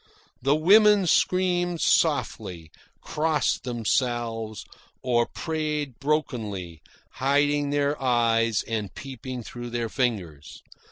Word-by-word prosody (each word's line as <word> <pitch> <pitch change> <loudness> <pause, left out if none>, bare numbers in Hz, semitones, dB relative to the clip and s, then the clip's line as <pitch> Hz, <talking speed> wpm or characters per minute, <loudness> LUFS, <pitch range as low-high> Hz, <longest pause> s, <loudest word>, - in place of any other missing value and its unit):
The 140 +3 +3
women 205 +4 +5
screamed 175 0 +1
softly, 85 - 0 0.3
crossed 155 -3 0
themselves, 115 -2 -2 0.4
or 120 -2 +2
prayed 150 -5 -3
brokenly, 110 - -2 0.4
hiding 145 +1 +2
their 145 0 0
eyes 115 -3 +2
and 110 -4 -3
peeping 130 -2 -7
through 120 +2 -8
their 120 -1 -3
fingers. 95 - -3
125 Hz, 95 wpm, -25 LUFS, 115-150 Hz, 0.4 s, women